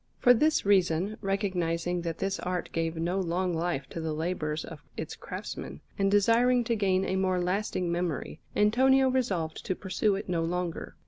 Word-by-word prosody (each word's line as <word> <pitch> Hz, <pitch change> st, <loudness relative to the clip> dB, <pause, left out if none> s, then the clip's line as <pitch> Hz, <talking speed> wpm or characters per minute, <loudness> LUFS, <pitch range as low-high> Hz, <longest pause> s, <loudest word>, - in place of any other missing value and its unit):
For 245 Hz, -, +6 dB
this 305 Hz, +3 st, +2 dB
reason, 190 Hz, 0 st, +2 dB
recognizing 180 Hz, -3 st, -1 dB
that 165 Hz, -1 st, -3 dB
this 195 Hz, 0 st, -2 dB
art 180 Hz, -1 st, -3 dB
gave 165 Hz, 0 st, -1 dB
no 170 Hz, +4 st, -1 dB
long 180 Hz, 0 st, 0 dB
life 165 Hz, -4 st, -1 dB
to 165 Hz, -, -5 dB
the 160 Hz, -1 st, -2 dB
labours 155 Hz, -1 st, -2 dB
of 160 Hz, -3 st, -10 dB, 0.2 s
its -, -, -5 dB
craftsmen, 70 Hz, +2 st, -7 dB, 0.2 s
and 195 Hz, 0 st, +1 dB
desiring 230 Hz, +5 st, +4 dB
to 230 Hz, 0 st, 0 dB
gain 190 Hz, -3 st, +1 dB
a 190 Hz, -, -1 dB
more 185 Hz, -1 st, +1 dB
lasting 180 Hz, -1 st, -1 dB
memory, 170 Hz, -3 st, -2 dB, 0.2 s
Antonio 260 Hz, +5 st, +4 dB
resolved 190 Hz, -12 st, -1 dB
to 185 Hz, -, -2 dB
pursue 195 Hz, +2 st, 0 dB
it 195 Hz, -, -5 dB
no 175 Hz, -3 st, 0 dB
longer. 175 Hz, +1 st, -3 dB
185 Hz, 175 wpm, -29 LUFS, 170-205 Hz, 0.2 s, For